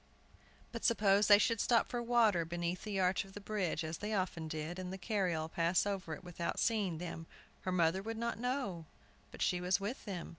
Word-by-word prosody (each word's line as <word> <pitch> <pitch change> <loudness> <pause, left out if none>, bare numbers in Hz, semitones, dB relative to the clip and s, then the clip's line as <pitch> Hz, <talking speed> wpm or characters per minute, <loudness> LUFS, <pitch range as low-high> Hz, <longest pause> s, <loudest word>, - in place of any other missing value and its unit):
But 230 -1 -6
suppose 205 -3 +4
they 205 - +9
should 230 +1 +2
stop 235 -2 +3
for 240 - -3
water 230 -7 +3
beneath 175 +2 -3
the 205 -2 -2
arch 185 +1 +2
of 195 -1 -15
the 205 - -7
bridge, 195 -5 -2
as 160 +1 -4
they 210 +1 -2
often 180 -4 -2
did, 155 +3 -4
and 185 -1 -5
the 190 - -5
carryall 180 -5 -1
pass 170 +3 +1
over 190 -6 -3
it - - -14
without 175 -1 -3
seeing 205 -7 +1
them, 165 -1 -6 0.3
her 185 - -3
mother 175 +1 +2
would 225 +2 -5
not 235 -1 -2
know 245 - -2 0.4
but - - -4
she 180 -1 +1
was 180 +2 +2
with 210 +7 -4
them? 190 -5 -5
190 Hz, 210 wpm, -35 LUFS, 170-215 Hz, 0.4 s, they